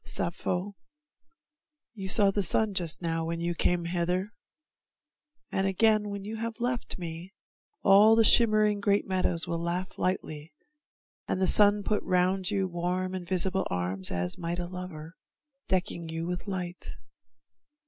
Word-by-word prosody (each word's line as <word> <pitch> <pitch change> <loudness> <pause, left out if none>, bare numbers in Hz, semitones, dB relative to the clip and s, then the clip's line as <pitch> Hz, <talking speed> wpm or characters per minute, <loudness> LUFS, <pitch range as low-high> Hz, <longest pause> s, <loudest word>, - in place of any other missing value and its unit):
Sappho, 180 +3 -3 1.2
you 195 -4 -6
saw 200 0 +6
the 205 - 0
sun 210 +3 +2
Just 175 -2 -2
now 165 -1 -1
when 165 +1 -3
you 170 +1 -1
came 175 0 0
hither, 180 +4 -1 1.2
and 195 0 0
again, 215 +2 +2
When 200 -1 -6
you 220 +2 -5
have 230 +1 -5
left 245 0 -2
me, 170 +2 -8 0.5
all 210 +3 +7
the 225 - +5
shimmering 215 -2 +4
Great 205 0 +1
meadows 185 -3 -1
will 170 - -2
laugh 175 +2 -3
lightly, 155 -4 -3 0.7
and - - -1
the 190 - +2
sun 205 +2 +5
Put 210 +1 0
round 185 +1 +1
about - - 0
you 195 -2 0
warm 180 +1 -2
invisible 185 +1 -1
arms 90 +1 -2
As 90 0 -2
might 170 0 -3
a 175 - -3
lover, 175 -3 -8 0.6
decking 175 -3 -1
you 165 +1 -4
with 180 +3 -5
light. 180 -2 -5
185 Hz, 150 wpm, -28 LUFS, 170-200 Hz, 1.2 s, all